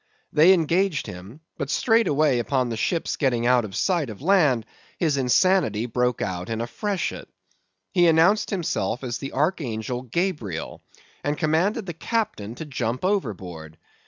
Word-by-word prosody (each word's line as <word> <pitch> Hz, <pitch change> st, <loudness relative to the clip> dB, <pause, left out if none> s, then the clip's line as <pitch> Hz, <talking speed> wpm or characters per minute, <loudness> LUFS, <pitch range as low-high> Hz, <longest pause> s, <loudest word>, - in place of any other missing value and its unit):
They 160 Hz, +5 st, +7 dB
engaged 175 Hz, -1 st, +2 dB
him; 95 Hz, -, -10 dB, 0.2 s
but 140 Hz, -, -3 dB
straightway 155 Hz, -, +3 dB
upon 125 Hz, +1 st, 0 dB
the 115 Hz, -, -3 dB
ship's 165 Hz, +9 st, -1 dB
getting 120 Hz, -5 st, +1 dB
out 125 Hz, 0 st, +4 dB
of 95 Hz, -, -8 dB
sight 170 Hz, -8 st, +1 dB
of 105 Hz, -, -8 dB
land, 150 Hz, -, +3 dB, 0.3 s
his 155 Hz, -4 st, +1 dB
insanity 130 Hz, -, +2 dB
broke 125 Hz, 0 st, 0 dB
out 90 Hz, 0 st, -4 dB
in 115 Hz, 0 st, -2 dB
a 115 Hz, -, -1 dB
freshet. 200 Hz, -, -3 dB, 0.6 s
He 175 Hz, -1 st, +4 dB
announced 170 Hz, +6 st, +4 dB
himself 135 Hz, -, -2 dB
as 120 Hz, -2 st, -3 dB
the 135 Hz, -, -6 dB
archangel 125 Hz, -, -1 dB
Gabriel, 130 Hz, -, -3 dB, 0.4 s
and 145 Hz, +1 st, -1 dB
commanded 180 Hz, +8 st, +1 dB
the 175 Hz, -, -5 dB
captain 160 Hz, -, -3 dB
to 160 Hz, -, -7 dB
jump 130 Hz, 0 st, -3 dB
overboard. 90 Hz, -, -3 dB
140 Hz, 150 wpm, -24 LUFS, 115-175 Hz, 0.6 s, They